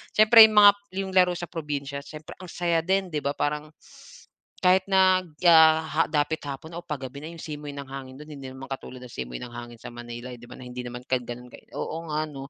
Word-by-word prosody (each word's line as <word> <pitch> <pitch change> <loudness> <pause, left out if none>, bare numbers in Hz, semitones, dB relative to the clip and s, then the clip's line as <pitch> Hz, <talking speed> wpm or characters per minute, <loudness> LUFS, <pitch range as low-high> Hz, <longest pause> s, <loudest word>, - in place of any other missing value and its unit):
siyempre 215 +2 +8
yung 215 - -5
mga 205 -1 +10 0.3
yung 195 -1 -2
laro 180 -1 +4
sa 175 - -5
probinsya 140 -4 -4
siyempre 155 +1 -10
ang 185 - -9
saya 170 -2 0
din, 190 +1 0
di 150 - -1
ba? 140 0 -2
Parang, 150 +1 -2 1.0
kahit 185 +1 +4
nag 185 -4 +3
ah, 160 -1 +7
ha, 160 +1 0
dapit 155 +1 0
hapon 150 +4 -7
o 175 - -5
'pag 145 -5 -6
gabi 140 +3 -11
na 160 - -6
yung 170 - -11
simoy 150 -2 -7
ng 140 - -6
hangin 135 -1 -8
do'n 150 - -10
hindi 135 -2 -8
naman 130 +1 -9
katulad 130 -1 -7
ng 125 - -10
simoy 60 -1 -5
ng 120 -1 -8
hangin 120 0 -9
sa - - -8
Manilay 120 +1 -8
'di 120 - -14
ba, - - -10
na 125 - -11
hindi 125 0 -6
naman 125 0 -7
ka 130 -1 +1
gano'n, 125 +1 -9 0.3
oo 160 - -4
nga 155 +1 0
'no? 135 -2 -9
150 Hz, 230 wpm, -26 LUFS, 130-170 Hz, 1.0 s, mga